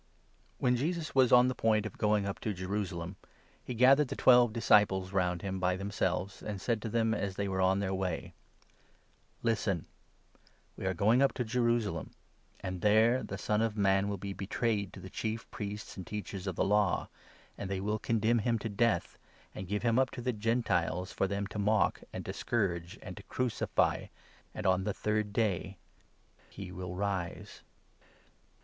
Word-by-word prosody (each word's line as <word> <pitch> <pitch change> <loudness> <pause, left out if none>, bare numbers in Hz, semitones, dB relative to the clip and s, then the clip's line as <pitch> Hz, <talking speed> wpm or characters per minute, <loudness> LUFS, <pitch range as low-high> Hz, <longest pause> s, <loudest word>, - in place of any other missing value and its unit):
When 125 0 +2
Jesus 160 +5 -2
was 130 -2 +4
on 125 0 +7
the 130 - 0
point 110 -3 +2
of 110 - -6
going 105 -1 +2
up 100 0 -4
to - - -3
17 105 - -2
a - - -16
thje«Tt/me, 95 - -4
Jerusalem, 90 -3 -3 0.5
he - - -5
gathered 135 +4 +6
the - - -4
twelve 120 -2 +6
disciples 105 -4 +3
round 90 -2 +1
foretells 95 -1 -3
him 95 - -3
by 90 0 +1
themselves, 95 -1 -2
and 105 -2 -5
said 110 +3 -1
to 115 - -4
them 115 0 +1
as 100 -3 -2
they 100 0 -1
were 95 -1 -2
his 95 - +4
Death. - - +4
on 95 - +1
t|lejr 95 -1 -1
way. 90 -3 -3 0.6
" - - -36
Listen! 110 -7 0 0.9
We 95 - -4
are 95 - 0
going 110 +8 +4
up 140 - +4
to 125 - -2
Jerusalem; 115 -7 0 0.5
and 95 -1 -4
there 110 +5 +4
the - - -5
Son 105 0 0
18 - - +4
of 110 -1 -9
Man 100 0 +3
will 100 - -2
be 100 +1 -5
betrayed 100 +1 -1
to - - -9
the 95 - -9
Chief 110 0 -3
Priests 105 0 -6
and 95 - -8
Teachers 100 -2 -5
of 95 - -2
the - - +1
Law, 105 -2 +2 0.5
and 95 - -6
they 95 -1 -1
will 105 +3 -1
condemn 115 +2 +2
him 115 +2 +1
to 110 +1 -4
death, 110 +2 0 0.3
and 95 - -6
give 105 +3 -2
him 115 -1 +3
19 - - +6
up 130 - +1
to 120 - -5
the 125 0 0
Gentiles 105 -5 0
for 95 - 0
them 100 +1 -2
to 100 +1 -6
mock, 105 +1 +2
and - - -6
to - - -4
scourge, 90 -7 -1
and - - -7
to - - -8
crucify; 125 -3 0 0.5
and - - -5
on 95 0 +3
the 100 0 -2
third 105 -1 -1
day 100 -3 -1 0.7
he 95 -2 -8
will 90 -1 -6
rise." 95 -3 -3
105 Hz, 200 wpm, -31 LUFS, 95-115 Hz, 0.9 s, on